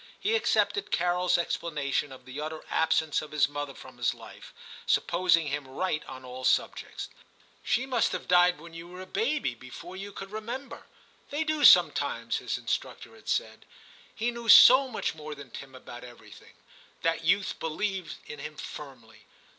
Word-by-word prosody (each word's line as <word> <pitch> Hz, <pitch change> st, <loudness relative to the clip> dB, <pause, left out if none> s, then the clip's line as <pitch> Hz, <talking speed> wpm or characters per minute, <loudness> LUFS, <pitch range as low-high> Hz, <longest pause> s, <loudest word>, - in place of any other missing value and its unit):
He 440 Hz, +3 st, +1 dB
accepted 430 Hz, -2 st, +1 dB
CaroFs 180 Hz, +1 st, +2 dB
explanation 150 Hz, -5 st, -2 dB
of 130 Hz, -1 st, -12 dB
the 130 Hz, +3 st, -7 dB
utter 155 Hz, +1 st, -6 dB
absence 160 Hz, -1 st, +2 dB
of 155 Hz, -, -9 dB
his 150 Hz, -1 st, +3 dB
mother 145 Hz, -1 st, -5 dB
from -, -, -13 dB
his -, -, +1 dB
life, -, -, -13 dB, 0.4 s
supposing 170 Hz, -2 st, +3 dB
him 140 Hz, -1 st, -3 dB
right 150 Hz, +3 st, -2 dB
on 130 Hz, -1 st, -10 dB
all 130 Hz, +1 st, -8 dB
subjects. -, -, 0 dB, 0.3 s
* -, -, -32 dB
She 250 Hz, -, +2 dB
must 255 Hz, -3 st, +1 dB
have -, -, -5 dB
died 180 Hz, -1 st, +5 dB
when 165 Hz, +1 st, -12 dB
you 165 Hz, +1 st, -9 dB
were 180 Hz, +1 st, -10 dB
a -, -, -7 dB
baby, 265 Hz, -, -1 dB
before 130 Hz, +9 st, -10 dB
you 200 Hz, +2 st, -7 dB
could 195 Hz, 0 st, -9 dB
remember; 235 Hz, +6 st, -6 dB, 0.4 s
they 295 Hz, +2 st, -1 dB
do 310 Hz, -1 st, -1 dB
sometimes,' -, -, +5 dB
his -, -, -3 dB
instructor -, -, -4 dB
had -, -, -12 dB
said; -, -, -2 dB, 0.5 s
he 235 Hz, +2 st, -1 dB
knew 235 Hz, -1 st, -6 dB
so 260 Hz, +5 st, +9 dB
much 250 Hz, -, -2 dB
more 155 Hz, -1 st, -8 dB
than 140 Hz, -4 st, -12 dB
Tim 135 Hz, -1 st, -9 dB
about 120 Hz, -1 st, -10 dB
everything. 120 Hz, -1 st, -14 dB, 0.5 s
That 165 Hz, 0 st, 0 dB
youth 195 Hz, +4 st, +1 dB
believed 185 Hz, +3 st, -3 dB
in 150 Hz, -, -9 dB
him 150 Hz, +1 st, -7 dB
firmly. 120 Hz, -9 st, -10 dB
165 Hz, 170 wpm, -28 LUFS, 140-205 Hz, 0.5 s, so